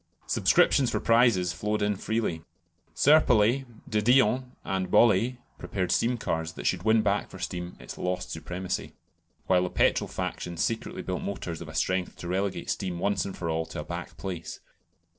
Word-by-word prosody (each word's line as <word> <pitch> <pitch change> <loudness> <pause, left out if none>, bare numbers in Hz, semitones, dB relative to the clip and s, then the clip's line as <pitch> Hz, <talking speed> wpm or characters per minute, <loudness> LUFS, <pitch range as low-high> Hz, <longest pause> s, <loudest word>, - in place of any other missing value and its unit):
Subscriptions 130 -3 +3
for - - -1
prizes 115 -7 +3
flowed 105 +3 -1
in 105 0 +1
freely. 105 -5 -2 0.5
Serpollet, 135 -4 +4 0.2
de 105 -1 +1
Dion, 125 +2 +3
and 95 -1 -2
Bollée 120 +3 +4 0.2
prepared 90 -3 -2
steam 120 +1 +2
cars 80 -6 -2
that - - -8
should 95 - +1
win 110 +2 +3
back 100 0 0
for - - -10
steam 90 0 -5
its - - -9
lost 90 0 -2
supremacy, 90 +3 -4 0.5
while 90 -1 +3
the 90 - -1
petrol - - +2
faction 85 -1 -4
secretly 115 +5 -2
built 90 - -3
motors 85 -4 -5
of 80 - -7
a 80 - -10
strength 90 +4 0
to 85 - -8
relegate 95 +2 -1
steam 90 -3 -3
once 100 +3 0
and 95 - -6
for 85 - -4
all 80 0 -1
to - - -5
a - - -6
back 85 +2 -7
place. 90 -4 -6
95 Hz, 175 wpm, -27 LUFS, 90-110 Hz, 0.5 s, Serpollet